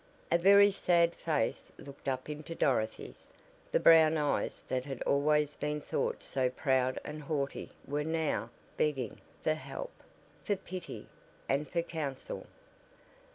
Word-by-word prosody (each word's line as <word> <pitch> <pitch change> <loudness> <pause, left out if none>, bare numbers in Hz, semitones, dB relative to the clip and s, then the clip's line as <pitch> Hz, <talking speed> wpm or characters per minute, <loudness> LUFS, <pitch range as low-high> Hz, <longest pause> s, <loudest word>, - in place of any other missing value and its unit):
A 170 - +6
very 200 +3 +7
sad 170 -3 +3
face 155 -3 -1
looked 140 0 -12
up 130 -1 -1
into 150 +2 -6
Dorothy's. 110 -7 -1 0.4
The - - +3
brown 160 -1 +7
eyes 150 -1 -1
that 130 -1 -1
had 135 -2 -5
always 150 +1 +2
been 150 0 -2
thought - - -2
so 130 -1 0
proud 130 -1 +1
and 150 0 -6
haughty 140 -2 -3 0.2
were 145 +1 -1
now 155 -8 -1 0.3
"begging" 135 -7 -1 0.2
for 155 - +3
help, 320 - -6 0.5
for 205 - +1
pity, 185 -1 -8 0.4
and 140 +1 0
for 170 -1 0
counsel. 150 -6 -5
150 Hz, 135 wpm, -32 LUFS, 135-165 Hz, 0.5 s, very